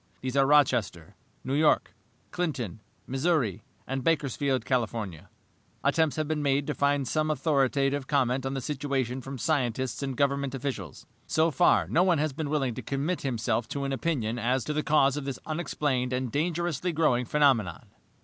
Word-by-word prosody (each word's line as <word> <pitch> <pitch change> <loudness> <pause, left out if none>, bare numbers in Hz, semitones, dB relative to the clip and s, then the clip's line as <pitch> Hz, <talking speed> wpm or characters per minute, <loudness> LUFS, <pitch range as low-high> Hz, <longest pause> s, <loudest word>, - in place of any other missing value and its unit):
These 130 0 -3
are 135 -1 +4
Rochester, 120 - +2 0.3
New 130 - -3
York, 150 -9 +3 0.4
Clinton, 135 - -3 0.3
Missouri, 135 - 0 0.2
and 135 0 -3
Bakersfield, 140 -5 0
California. 115 - -2 0.5
"Attempts 160 -3 +2
have 155 -1 -1
been 155 -1 -1
made 140 0 +1
to 150 - -2
find 140 -2 +1
some 155 0 0
authoritative 140 -2 +1
comment 130 -2 +1
on 135 +1 -3
the 135 - -2
situation 135 -2 -2
from 135 +2 -7
scientists 130 -3 -1
and 135 -3 -3
Government 140 -1 0
officials. 135 0 -5 0.2
So 160 +1 +2
far, 155 +6 +3
no 170 - +2
one 180 -2 +3
has 150 -1 0
been 155 0 -4
willing 135 -5 0
to - - -6
commit 145 +6 -2
himself 120 -3 -1
to 140 +3 -4
an 135 0 -1
opinion 125 -6 -1
as 125 +2 +1
to 150 - -3
the 150 - 0
cause 145 -2 +3
of 145 - -4
this 140 -2 -3
unexplained 145 -5 -1
and 125 -2 -2
dangerously 170 +2 -1
growing 150 -6 +2
phenomenon. 130 - +2
140 Hz, 170 wpm, -28 LUFS, 125-150 Hz, 0.5 s, are